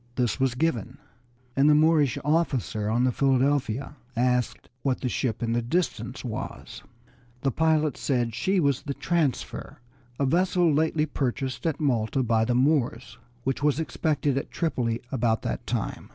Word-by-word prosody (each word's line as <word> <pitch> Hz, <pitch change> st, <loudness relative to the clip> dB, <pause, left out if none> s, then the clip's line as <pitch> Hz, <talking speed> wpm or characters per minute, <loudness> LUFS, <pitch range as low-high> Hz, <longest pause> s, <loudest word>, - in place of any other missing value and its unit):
This 125 Hz, -1 st, 0 dB
was 130 Hz, -2 st, +1 dB
given, 130 Hz, -4 st, -1 dB, 0.6 s
and 140 Hz, +2 st, +5 dB
the 150 Hz, -, +6 dB
Moorish 150 Hz, -4 st, +4 dB
officer 135 Hz, -9 st, 0 dB
on 120 Hz, +3 st, +2 dB
the 130 Hz, -, +3 dB
Philadelphia 135 Hz, 0 st, +1 dB, 0.2 s
asked 125 Hz, 0 st, 0 dB
what 135 Hz, -2 st, -1 dB
the 125 Hz, -, -1 dB
ship 120 Hz, -2 st, -2 dB
in 115 Hz, 0 st, 0 dB
the 120 Hz, -, +1 dB
distance 170 Hz, +10 st, -2 dB
was. -, -, -6 dB, 0.6 s
The 135 Hz, -, +1 dB
pilot 155 Hz, 0 st, +2 dB
said 125 Hz, -4 st, 0 dB
that 110 Hz, -, -9 dB
she 190 Hz, +9 st, +1 dB
was 140 Hz, -5 st, +2 dB
the 140 Hz, -2 st, -4 dB
Transfer, 165 Hz, -7 st, -2 dB, 0.4 s
a 140 Hz, -, +2 dB
vessel 175 Hz, +2 st, +3 dB
lately 155 Hz, +1 st, +2 dB
purchased 135 Hz, 0 st, -2 dB
at 160 Hz, -, -1 dB
Malta 130 Hz, -3 st, +1 dB
by 115 Hz, -1 st, +2 dB
the 120 Hz, +1 st, 0 dB
Moors, 125 Hz, -4 st, +1 dB, 0.2 s
which 135 Hz, +1 st, -1 dB
was 150 Hz, 0 st, +2 dB
expected 145 Hz, -1 st, 0 dB
at -, -, -8 dB
Tripoli 120 Hz, -9 st, -1 dB
about 115 Hz, -3 st, +1 dB
that -, -, -4 dB
time. -, -, -3 dB
135 Hz, 160 wpm, -26 LUFS, 120-150 Hz, 0.6 s, the